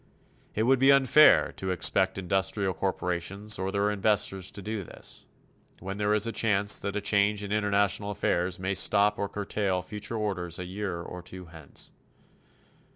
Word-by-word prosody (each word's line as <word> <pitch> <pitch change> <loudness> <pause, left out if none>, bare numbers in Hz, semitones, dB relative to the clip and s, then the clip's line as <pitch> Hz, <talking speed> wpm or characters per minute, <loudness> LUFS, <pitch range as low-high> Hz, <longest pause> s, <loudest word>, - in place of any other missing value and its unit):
It 110 - +1
would 130 +2 +3
be 135 +1 +6
unfair 140 +2 +6
to 95 - -4
expect 95 +1 +2
industrial 95 +1 -1
corporations 95 +3 -2
or 95 +1 -2
their 100 +1 +1
investors 95 -2 0
to 100 - -11
do 110 -1 -4
this, - - -10 0.5
when 95 +2 -6
there 105 0 +1
is 105 +1 +1
a 115 - -2
chance 105 -3 +2
that 100 0 -4
a 105 - -1
change 105 0 +2
in 100 - -6
international 100 -1 +1
affairs 90 -2 -1
may 95 +1 -2
stop 105 +2 +3
or 100 - -2
curtail 100 -2 -2
future 105 +4 -5
orders 90 -5 -2
a 90 - -5
year 95 -2 -5
or 90 - -8
two 90 +1 -10
hence. 80 -3 -7
100 Hz, 165 wpm, -27 LUFS, 95-105 Hz, 0.5 s, be